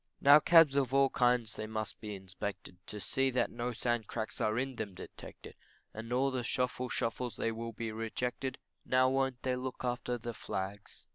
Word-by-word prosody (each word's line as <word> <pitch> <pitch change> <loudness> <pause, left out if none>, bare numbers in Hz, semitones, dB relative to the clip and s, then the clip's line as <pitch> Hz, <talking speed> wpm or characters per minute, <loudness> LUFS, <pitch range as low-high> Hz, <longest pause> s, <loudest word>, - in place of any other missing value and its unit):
Now 145 +2 +8
cabs 165 -3 +7
of 135 -2 +1
all 135 -1 +5
kinds 120 -3 +2
they 110 - -5
must 110 -1 -4
be 105 -2 -5
inspected 95 -1 -6
To 105 - -5
see 135 +8 +1
that 125 -1 +1
no 120 +1 -3
sand 120 -2 -1
cracks 110 -2 -4
are 110 +1 +1
in 130 0 -2
them 100 -4 -4
detected - - -10 0.4
And 115 +2 -7
all 135 +2 +2
the 130 -1 -1
shofle 125 +1 -1
shofles 115 0 -2
they 115 - 0
will 115 +1 -5
be 115 0 -4
rejected 125 +4 -3 0.3
Now 130 0 +4
won't 135 -1 0
they 130 -1 +1
look 130 0 -5
after 125 0 -1
the 120 0 -5
flags. 100 -1 -5
120 Hz, 190 wpm, -33 LUFS, 110-130 Hz, 0.4 s, Now